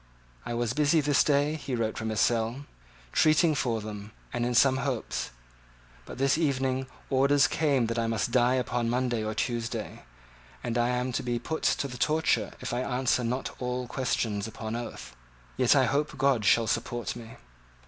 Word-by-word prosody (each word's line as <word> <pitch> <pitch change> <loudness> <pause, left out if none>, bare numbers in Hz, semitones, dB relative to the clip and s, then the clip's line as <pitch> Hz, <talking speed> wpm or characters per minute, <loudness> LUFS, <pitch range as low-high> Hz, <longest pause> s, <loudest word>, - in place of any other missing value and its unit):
"I 120 - -3
was 120 -1 -1
busy 150 +2 +3
this 145 -1 +3
day," 145 +1 +2
he 135 -4 -4
wrote 115 -2 -1
from 110 - -3
his 110 -1 -1
cell, 120 +4 +1 0.5
"treating 155 - +4
for 120 -6 -1
them, 105 0 -8 0.2
and 120 0 0
in 125 - -1
some 130 +2 +5
hopes. 130 -3 -2 0.8
But - - -8
this 135 +3 +2
evening 135 -3 0 0.2
orders 140 +1 +4
came 140 -6 +1
that 115 +1 -2
I 115 - 0
must 115 -1 -1
die 125 0 +3
upon 120 -2 -1
Monday 120 -2 0
or 110 0 -3
Tuesday; 120 0 -3 0.6
and 115 - -2
I 120 0 +2
am 125 +1 -1
to - - -1
be 120 -1 -1
put 160 +7 -4
to 140 - +1
the 125 -2 -9
torture 160 +1 +1
if 125 -1 -4
I 120 - 0
answer 125 -1 0
not 125 +3 -2
all 125 0 -2
questions 115 -5 -1
upon 110 0 -5
oath. 120 - -7 0.4
Yet 125 +2 +4
I 135 -2 +5
hope 145 +3 -1
God 130 -5 +2
shall 115 +4 +4
support 120 +2 -2
me." 115 -1 -10
125 Hz, 180 wpm, -28 LUFS, 115-135 Hz, 0.8 s, some